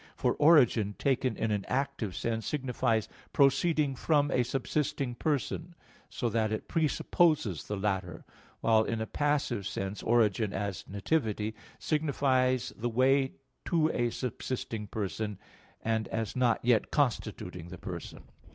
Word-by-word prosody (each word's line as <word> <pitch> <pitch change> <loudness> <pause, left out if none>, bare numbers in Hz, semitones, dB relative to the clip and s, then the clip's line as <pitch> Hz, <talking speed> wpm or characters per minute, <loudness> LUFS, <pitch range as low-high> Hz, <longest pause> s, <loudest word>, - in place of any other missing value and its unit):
For - - +1
origin 125 -10 +5
taken 130 -3 0
in 110 - 0
an 105 -2 0
active 130 -7 -2
sense 115 -1 -2
signifies 125 -6 0 0.3
proceeding 145 +1 +3
from 145 +2 +2
a 125 - +3
subsisting 135 +1 -1
person, 155 +6 -2 0.3
so 120 - -2
that 110 -1 0
it 110 - -3
presupposes 155 - +1
the 105 - -3
latter; 95 -4 -2 0.4
while 110 -1 +4
in 115 0 -2
a 110 - -1
passive 145 -7 0
sense 95 0 -4
origin, 110 -3 +2
as 100 -1 -3
"nativity," 110 0 -1 0.2
signifies 130 -4 +1
the 120 +2 -2
way 130 +3 +3 0.3
to 160 -3 +2
a 120 0 +1
subsisting 115 -3 -4
person, 105 0 -3 0.5
and 110 -1 0
as 110 -2 -3
not 125 -2 +2
yet 120 -3 +3
constituting 105 - -1
the 90 - -8
person. 90 -4 -7
120 Hz, 135 wpm, -30 LUFS, 105-140 Hz, 0.5 s, origin